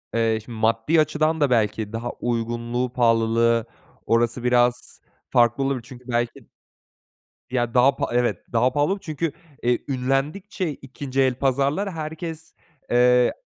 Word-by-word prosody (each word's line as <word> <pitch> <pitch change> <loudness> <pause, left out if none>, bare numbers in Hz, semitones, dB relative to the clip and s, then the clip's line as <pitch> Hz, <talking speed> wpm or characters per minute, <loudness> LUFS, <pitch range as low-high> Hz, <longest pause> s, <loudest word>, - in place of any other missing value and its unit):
eee, 115 -1 +2
şimdi, 115 -2 -8
maddi 115 +8 +3
açıdan 155 +1 0
da, 145 - +4
belki, 110 -2 0
daha 120 +2 -3
uygunluğu, 120 +1 -2
pahalılığı 115 -1 +3 0.4
orası 115 +1 +1
biraz 125 0 +1 0.3
farklı 120 +2 +3
olabilir 135 -3 -1
çünkü, 125 -1 -12
belki 120 -1 -2 1.1
Ya, 120 -2 0
daha 130 +2 +5
pa - - -2
Evet, 120 0 +1
daha 120 +2 +3
pahalı 145 +1 +1
olabilir 200 - -5
çünkü, 155 0 -2 0.3
eee, 120 0 +2
ünlendikçe 145 +9 -1
2'nci 135 -1 -4
el 130 -1 +2
pazarlar 140 +9 0
herkes, 160 0 -6 0.4
eee, 125 0 +4
125 Hz, 135 wpm, -23 LUFS, 120-145 Hz, 1.1 s, daha